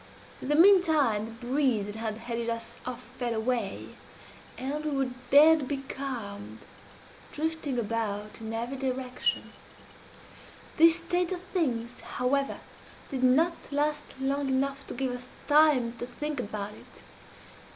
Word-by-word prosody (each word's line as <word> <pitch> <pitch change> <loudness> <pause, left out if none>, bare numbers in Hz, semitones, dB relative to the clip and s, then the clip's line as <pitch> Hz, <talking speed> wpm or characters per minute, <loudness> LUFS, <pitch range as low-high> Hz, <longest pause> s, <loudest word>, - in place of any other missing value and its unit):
"In - - -5
the 295 - +2
meantime 315 - +5
the - - -9
breeze 255 -5 +2
that 205 +1 -6
had 220 -1 -3
headed 235 0 -3
us 230 0 -4
off 250 0 -5 0.2
fell 240 -2 -1
away, 220 -2 -2 0.7
and 285 +4 -3
we 305 - -1
were 265 -2 0 0.2
dead 300 0 +7
becalmed, 260 -7 -5 0.7
drifting 310 -3 -2
about 215 -2 -2
in 220 0 -5
every 235 +4 -3
direction. 255 -1 -1 1.2
This 330 0 +7
state 355 +1 -1
of 360 -1 -3
things, 250 -11 -2
however, 275 +2 -1 0.5
did 265 -2 -2
not 305 +7 +5 0.2
last 295 -1 -1
long 275 +1 0
enough 275 +1 -1
to - - -5
give 260 0 -1
us 250 0 -6 0.2
time 290 -6 +5
to 240 - -4
think 295 +3 -4
about 210 -2 -4
it. - - -16
260 Hz, 135 wpm, -29 LUFS, 230-295 Hz, 1.2 s, dead